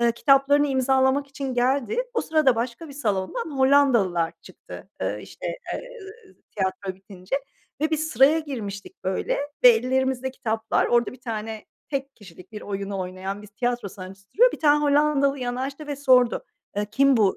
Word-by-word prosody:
Eee, 235 Hz, -1 st, +3 dB
kitaplarını 275 Hz, +3 st, +4 dB
imzalamak 265 Hz, +1 st, +2 dB
için 275 Hz, -2 st, -5 dB
geldi. 270 Hz, -, +1 dB
O -, -, +2 dB
sırada 305 Hz, -6 st, +3 dB
başka 240 Hz, +7 st, -4 dB
bir 280 Hz, -, -10 dB
salondan 240 Hz, -, -2 dB
Hollandalılar 235 Hz, -12 st, +3 dB
çıktı, -, -, -12 dB
eee, -, -, -2 dB
işte, -, -, -9 dB, 0.3 s
eee, -, -, -5 dB, 0.7 s
tiyatro 190 Hz, 0 st, -2 dB
bitince 190 Hz, +4 st, -6 dB, 0.4 s
ve 310 Hz, +1 st, +1 dB
biz 315 Hz, 0 st, 0 dB
sıraya 270 Hz, +6 st, +5 dB
girmiştik, 215 Hz, -14 st, -7 dB
böyle, 190 Hz, 0 st, -1 dB, 0.3 s
ve -, -, +12 dB
ellerimizde 260 Hz, +2 st, +1 dB
kitaplar, 225 Hz, -4 st, -1 dB
orada 240 Hz, 0 st, +2 dB
bir 255 Hz, -, -14 dB
tane 220 Hz, -2 st, -5 dB, 0.2 s
tek 275 Hz, -1 st, -4 dB
kişilik 185 Hz, 0 st, -15 dB
bir 210 Hz, -, -7 dB
oyunu 200 Hz, -1 st, -4 dB
oynayan 190 Hz, +2 st, -5 dB
bir -, -, -11 dB
tiyatro 240 Hz, +1 st, -2 dB
sanatçısı 195 Hz, 0 st, -12 dB
duruyor. -, -, +5 dB
Bir -, -, -7 dB
tane 295 Hz, -1 st, +4 dB
Hollandalı 285 Hz, -1 st, +3 dB
yanaştı 265 Hz, +4 st, -4 dB
ve 290 Hz, -2 st, -4 dB
sordu, 255 Hz, -4 st, +3 dB, 0.3 s
eee, 205 Hz, 0 st, 0 dB
kim 275 Hz, 0 st, +4 dB
bu, 200 Hz, -4 st, +3 dB
250 Hz, 160 wpm, -24 LUFS, 205-275 Hz, 0.7 s, ve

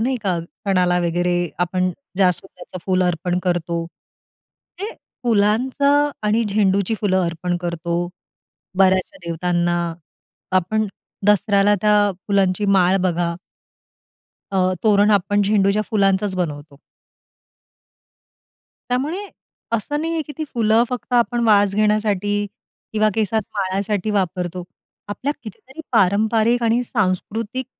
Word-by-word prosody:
नाही 255 Hz, +3 st, 0 dB
का 185 Hz, -4 st, 0 dB, 0.3 s
सणाला 180 Hz, -3 st, +2 dB
वगैरे 175 Hz, +1 st, 0 dB, 0.3 s
आपण 180 Hz, +1 st, 0 dB, 0.3 s
जास्वंदच 180 Hz, 0 st, -1 dB
फुलं 185 Hz, -1 st, +2 dB
अर्पण 175 Hz, +1 st, -1 dB
करतो, 170 Hz, -2 st, -1 dB, 0.9 s
ते 415 Hz, +4 st, -4 dB, 0.3 s
फुलांचं 255 Hz, +6 st, +2 dB
आणि 215 Hz, +2 st, +2 dB
झेंडूची 200 Hz, 0 st, +1 dB
फुलं 190 Hz, -3 st, +2 dB
अर्पण 175 Hz, +1 st, -2 dB
करतो 170 Hz, -1 st, -2 dB, 0.8 s
बऱ्याचशा 190 Hz, -1 st, +3 dB
देवतांना, 175 Hz, +1 st, 0 dB, 0.8 s
आपण 215 Hz, +4 st, +1 dB, 0.4 s
दसऱ्याला 205 Hz, 0 st, +4 dB
त्या 210 Hz, 0 st, +4 dB, 0.3 s
फुलांची 195 Hz, -1 st, +1 dB
माळ 190 Hz, -1 st, +4 dB
बघा 175 Hz, -2 st, 0 dB, 1.2 s
अ, 185 Hz, -1 st, +2 dB
तोरण 205 Hz, 0 st, +4 dB
आपण 205 Hz, 0 st, +2 dB
झेंडूच्या 200 Hz, 0 st, +2 dB
फुलांचाच 195 Hz, -2 st, +2 dB
बनवतो. 145 Hz, -5 st, -4 dB, 2.1 s
त्यामुळे, 310 Hz, +11 st, -2 dB, 0.4 s
असं 230 Hz, +7 st, -1 dB
नाहीये 325 Hz, 0 st, -1 dB
की 295 Hz, -, -7 dB
ती 315 Hz, -, -1 dB
फुलं 225 Hz, 0 st, +3 dB
फक्त 250 Hz, 0 st, -6 dB
आपण 240 Hz, 0 st, +2 dB
वास 205 Hz, -2 st, +4 dB
घेण्यासाठी 210 Hz, -1 st, +1 dB, 0.6 s
किंवा 215 Hz, 0 st, +3 dB
केसात 220 Hz, 0 st, 0 dB
माळासाठी 200 Hz, +1 st, -1 dB
वापरतो. 180 Hz, -3 st, -2 dB, 0.4 s
आपल्या 255 Hz, +7 st, -2 dB
कितीतरी 255 Hz, +7 st, -11 dB
पारंपारिक 220 Hz, +3 st, +3 dB
आणि 230 Hz, +2 st, +2 dB
सांस्कृतिक, 225 Hz, +3 st, -2 dB
200 Hz, 105 wpm, -20 LUFS, 180-220 Hz, 2.1 s, दसऱ्याला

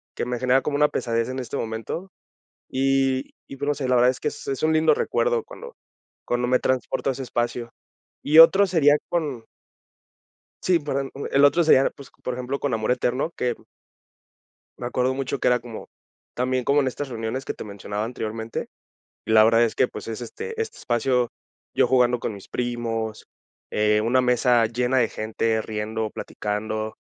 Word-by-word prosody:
que -, -, -2 dB
me 125 Hz, 0 st, -3 dB
genera 130 Hz, +2 st, +3 dB
como 145 Hz, -1 st, -1 dB
una 150 Hz, 0 st, +5 dB
pesadez 115 Hz, -1 st, -1 dB
en 130 Hz, -, -4 dB
este 130 Hz, +2 st, -4 dB
momento. 115 Hz, +12 st, -5 dB, 0.6 s
Y 135 Hz, 0 st, +1 dB, 0.2 s
y 135 Hz, -, -8 dB
pues, 140 Hz, +1 st, -4 dB
no 145 Hz, -, +2 dB
sé, 140 Hz, -3 st, -3 dB
la 130 Hz, -, +3 dB
verdad 125 Hz, +1 st, +5 dB
es 130 Hz, -, -5 dB
que -, -, 0 dB
es -, -, -8 dB
es 135 Hz, 0 st, -2 dB
un 160 Hz, -, +3 dB
lindo 155 Hz, -1 st, +4 dB
recuerdo 480 Hz, -, 0 dB
cuando 480 Hz, +1 st, -11 dB, 0.5 s
cuando 120 Hz, 0 st, 0 dB
me 125 Hz, -, +4 dB
transporto 130 Hz, +1 st, 0 dB
a -, -, 0 dB
ese 135 Hz, -, -6 dB
espacio. 120 Hz, 0 st, -2 dB, 0.5 s
Y 155 Hz, +2 st, +4 dB
otro 195 Hz, +5 st, +8 dB
sería 150 Hz, -5 st, +4 dB
con 145 Hz, -9 st, -2 dB, 1.2 s
sí, 180 Hz, -2 st, +3 dB
perdón, 140 Hz, -2 st, -3 dB
mm, 140 Hz, -, -5 dB
el 140 Hz, +1 st, +4 dB
otro 165 Hz, +4 st, +4 dB
sería, 135 Hz, -4 st, +5 dB
pues, 140 Hz, -, -14 dB
por 125 Hz, -, -2 dB
ejemplo, 125 Hz, +2 st, -3 dB
con 140 Hz, -4 st, -1 dB
amor 110 Hz, +2 st, 0 dB
eterno, 125 Hz, +5 st, 0 dB
que 125 Hz, -5 st, -2 dB, 1.2 s
me 120 Hz, -, -4 dB
acuerdo 125 Hz, +1 st, 0 dB
mucho 135 Hz, +1 st, -3 dB
que -, -, +1 dB
era 125 Hz, 0 st, +4 dB
como, 120 Hz, -2 st, -9 dB, 0.4 s
también 125 Hz, +1 st, 0 dB
como 140 Hz, +3 st, +3 dB
en 135 Hz, -, 0 dB
estas 140 Hz, +2 st, -4 dB
reuniones 115 Hz, +2 st, -4 dB
que -, -, -3 dB
te -, -, -8 dB
mencionaba 105 Hz, 0 st, -5 dB
anteriormente. 110 Hz, -1 st, -4 dB, 0.6 s
Y -, -, -2 dB
la 110 Hz, -1 st, +7 dB
verdad 115 Hz, +1 st, +5 dB
es 115 Hz, -, +1 dB
que, -, -, +3 dB
pues, -, -, -8 dB
es 115 Hz, +1 st, -5 dB
este 450 Hz, -, -6 dB
este 450 Hz, -, -4 dB
espacio, 120 Hz, +1 st, +1 dB, 0.5 s
yo -, -, +4 dB
jugando 125 Hz, -1 st, +3 dB
con -, -, -3 dB
mis 100 Hz, -2 st, -11 dB
primos, 115 Hz, -3 st, -3 dB, 0.4 s
eh, 105 Hz, 0 st, +2 dB
una 120 Hz, +4 st, +2 dB
mesa 125 Hz, -1 st, +3 dB
llena 125 Hz, +3 st, 0 dB
de 115 Hz, -, +3 dB
gente, 110 Hz, +1 st, -1 dB
riendo, 110 Hz, 0 st, -3 dB
platicando, 110 Hz, +1 st, -4 dB
125 Hz, 190 wpm, -24 LUFS, 115-135 Hz, 1.2 s, otro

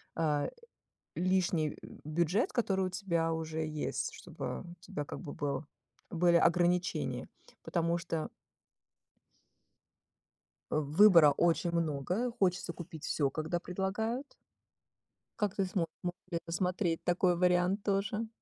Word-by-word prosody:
а, 150 Hz, -3 st, +1 dB, 0.7 s
лишний 175 Hz, -4 st, +1 dB, 0.3 s
бюджет, 170 Hz, +7 st, +1 dB
который 195 Hz, -6 st, +1 dB
у -, -, -3 dB
тебя 170 Hz, -4 st, 0 dB
уже 160 Hz, -1 st, -2 dB
есть, 155 Hz, -1 st, -2 dB
чтобы -, -, -6 dB
у 175 Hz, 0 st, -10 dB
тебя 150 Hz, -5 st, -5 dB
как -, -, -7 dB
бы 145 Hz, -, -7 dB
был, 140 Hz, 0 st, -2 dB, 0.5 s
были 175 Hz, 0 st, +4 dB
ограничения? 175 Hz, +2 st, +2 dB, 0.3 s
Потому 170 Hz, 0 st, 0 dB
что 165 Hz, -2 st, -3 dB, 2.4 s
Э, -, -, +1 dB
выбора 155 Hz, +1 st, +7 dB
очень 170 Hz, +3 st, +2 dB
много, 170 Hz, -, 0 dB
хочется 180 Hz, -6 st, 0 dB
купить 165 Hz, -2 st, -9 dB
всё, 140 Hz, -3 st, +1 dB
когда 160 Hz, +4 st, -2 dB
предлагают. 220 Hz, +9 st, -3 dB, 1.1 s
Как 205 Hz, -2 st, 0 dB
ты 195 Hz, -, +1 dB
смо 185 Hz, -2 st, 0 dB, 0.2 s
сможешь 175 Hz, -1 st, -4 dB
рассмотреть 175 Hz, 0 st, 0 dB
такой 175 Hz, 0 st, +3 dB
вариант 180 Hz, +2 st, +3 dB
тоже? 210 Hz, +3 st, 0 dB
175 Hz, 115 wpm, -32 LUFS, 160-190 Hz, 2.4 s, выбора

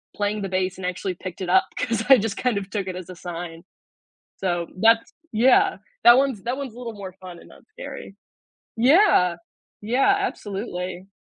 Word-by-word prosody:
playing 205 Hz, 0 st, -1 dB
the 195 Hz, -, -2 dB
bass 185 Hz, 0 st, -1 dB
and 185 Hz, -, -6 dB
actually 185 Hz, 0 st, -3 dB
picked 185 Hz, 0 st, -7 dB
it 180 Hz, -, -3 dB
up 190 Hz, +1 st, +5 dB
'cause 230 Hz, -3 st, -1 dB
I 265 Hz, -, +9 dB
just 215 Hz, -1 st, -2 dB
kind 245 Hz, -5 st, 0 dB
of 195 Hz, -1 st, -4 dB
took 200 Hz, -3 st, -3 dB
it 185 Hz, -, -4 dB
as 185 Hz, 0 st, -8 dB
a 180 Hz, -, -8 dB
sign. 170 Hz, -1 st, -7 dB, 0.7 s
So, 175 Hz, -3 st, -1 dB
that's, 225 Hz, +3 st, +3 dB, 0.2 s
yeah, 375 Hz, -, +4 dB, 0.3 s
that 240 Hz, +1 st, +9 dB
one's 265 Hz, -8 st, 0 dB
that 245 Hz, +2 st, -2 dB
one's 270 Hz, -5 st, -6 dB
a -, -, -13 dB
little 235 Hz, -2 st, -6 dB
more 195 Hz, -2 st, -8 dB
fun 180 Hz, -2 st, -10 dB
and -, -, -16 dB
not -, -, -17 dB
scary. -, -, -9 dB, 0.7 s
Yeah, 250 Hz, -, +5 dB, 0.5 s
yeah, 260 Hz, -, +3 dB
absolutely. 195 Hz, -, -4 dB
200 Hz, 185 wpm, -23 LUFS, 185-245 Hz, 0.7 s, I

